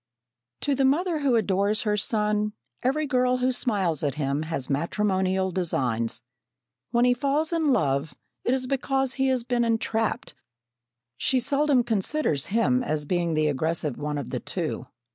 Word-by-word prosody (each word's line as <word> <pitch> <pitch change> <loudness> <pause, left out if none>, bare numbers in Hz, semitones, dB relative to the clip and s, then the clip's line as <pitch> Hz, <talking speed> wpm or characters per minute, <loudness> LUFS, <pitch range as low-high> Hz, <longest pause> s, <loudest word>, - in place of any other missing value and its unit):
To 285 - +1
the 270 0 +1
mother 320 +5 +2
who 275 -4 +2
adores 205 -1 +1
her 210 -2 +1
son, 210 0 0 0.3
every 300 +4 +1
girl 255 -2 +2
who 250 +1 +1
smiles 195 - 0
at 145 -3 -1
him 140 0 -1
has 155 -5 -3
matrimonial 190 +4 0
designs. 125 -11 -1 0.7
When 240 +1 +3
he 250 - +5
falls 285 +6 0
in 320 -3 +2
love, 140 - 0 0.3
it 250 - +2
is 260 -1 -2
because 270 0 0
he 270 -1 0
has 260 -2 +1
been 240 0 0
entrapped 225 -4 -1 0.9
she 260 - +2
seldom 275 0 +2
considers 220 - 0
him 230 +4 +2
as 155 -9 -1
being 170 0 0
the 155 0 +2
aggressive 150 -1 -1
one 150 0 -2
of 140 - -5
the - - -2
two. - - -4
220 Hz, 160 wpm, -26 LUFS, 165-260 Hz, 0.9 s, he